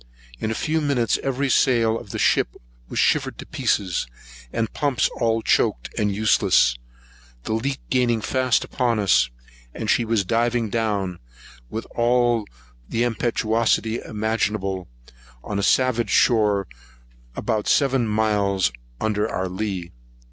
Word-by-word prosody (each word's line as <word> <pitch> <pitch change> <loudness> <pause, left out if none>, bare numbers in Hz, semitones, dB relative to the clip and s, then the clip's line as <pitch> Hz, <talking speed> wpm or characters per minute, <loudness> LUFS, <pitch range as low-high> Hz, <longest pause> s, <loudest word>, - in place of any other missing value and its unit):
In - - -2
a 110 - -2
few 160 +5 0
minutes 130 -7 +1
every 135 +1 -1
sail 120 -4 +3
of 105 - -13
the - - -5
ship - - +2 0.3
was - - -6
shivered - - +2
to - - -8
pieces; 95 -4 -1 0.4
the 115 - -1
pumps 140 -6 +1
all 115 -1 +1
choaked, - - +1
and 105 -1 0
useless; 105 - +3 0.7
the - - -2
leak 135 +5 -1
gaining 120 -3 +2
fast 130 +2 +1
upon 120 -3 0
us; 95 - +3 0.5
and - - -1
she 120 - +3
was 110 -3 0
driving 115 +1 0
down, 100 -6 -1 0.5
with 110 - -5
all 120 -2 +2 0.4
the 115 - 0
impetuosity 115 -1 0
imaginable, 105 -4 -2 0.6
on 100 -1 -3
a - - 0
savage 120 0 +2
shore, 105 -4 +3 0.7
about 110 -3 -2
seven 135 -4 +2
miles 105 - +1 0.3
under 110 0 0
our 95 +1 -2
lee. 95 -2 -4
110 Hz, 135 wpm, -23 LUFS, 105-120 Hz, 0.7 s, sail